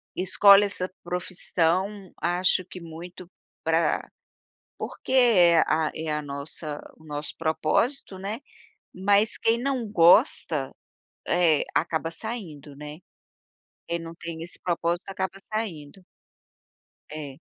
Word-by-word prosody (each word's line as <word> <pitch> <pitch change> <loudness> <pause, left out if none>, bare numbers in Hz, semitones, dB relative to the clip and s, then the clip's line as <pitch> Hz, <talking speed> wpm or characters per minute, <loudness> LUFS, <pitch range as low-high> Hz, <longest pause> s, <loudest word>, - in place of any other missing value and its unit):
escolhe 200 +2 +6
essa 190 -2 -3 0.2
profissão 185 +2 -1
acho 180 +1 +2
que 185 - -10
muito 170 +2 -10 0.3
para 165 +1 +1 0.7
porque - - -7
é 185 -10 +6
a 155 0 +1
é 160 -1 -3
a 150 - -1
nossa 145 +1 -6 0.2
o 160 - -19
nosso 150 0 -5
propósito, 185 - 0
né, 205 +4 -4 0.5
mas 200 +3 +2
quem 230 +1 +2
não 260 -4 -1
gosta, 170 - +4 0.5
eh, 170 -4 +3
acaba 165 0 0
saindo, 165 - -7
né, 150 +1 -8 0.9
quem 170 - -1
não 165 0 -8
tem 165 -1 -7
esse 175 - -8
propósito 170 0 -1
acaba 190 0 -3 0.2
saindo. 185 -5 -4 1.1
É. 145 -3 -7
175 Hz, 115 wpm, -26 LUFS, 160-195 Hz, 1.1 s, escolhe